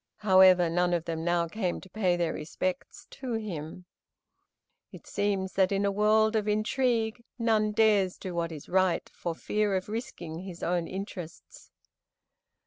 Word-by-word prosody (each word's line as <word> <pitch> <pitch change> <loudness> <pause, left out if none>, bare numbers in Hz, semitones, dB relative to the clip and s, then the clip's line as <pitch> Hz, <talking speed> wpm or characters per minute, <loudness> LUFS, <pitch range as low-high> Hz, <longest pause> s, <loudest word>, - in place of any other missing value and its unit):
However, 185 -2 +7
none 175 +1 +1
of 170 -1 -3
them 165 -1 -3
now 170 0 +1
came 180 0 -2
to - - -13
pay 185 -2 +1
their 170 -2 0
respects 180 +4 -4
to 260 -3 -5
him. 180 -6 -5 1.1
It - - -12
seems 195 -2 -1
that 190 0 +2
in 200 0 +1
a 200 - +2
world 215 +2 +3
of 215 -1 0
intrigue 225 +1 0
none 220 -3 +2
dares 210 -4 +3
do 185 - -6
what 170 -1 -2
is 150 -3 -9
right 185 -1 +1
for 170 -2 -4
fear 210 +2 0
of 185 +2 -3
risking 175 -8 -5
his 180 -2 -8
own 175 -1 0
interests. 185 -4 -8
190 Hz, 155 wpm, -28 LUFS, 175-215 Hz, 1.1 s, However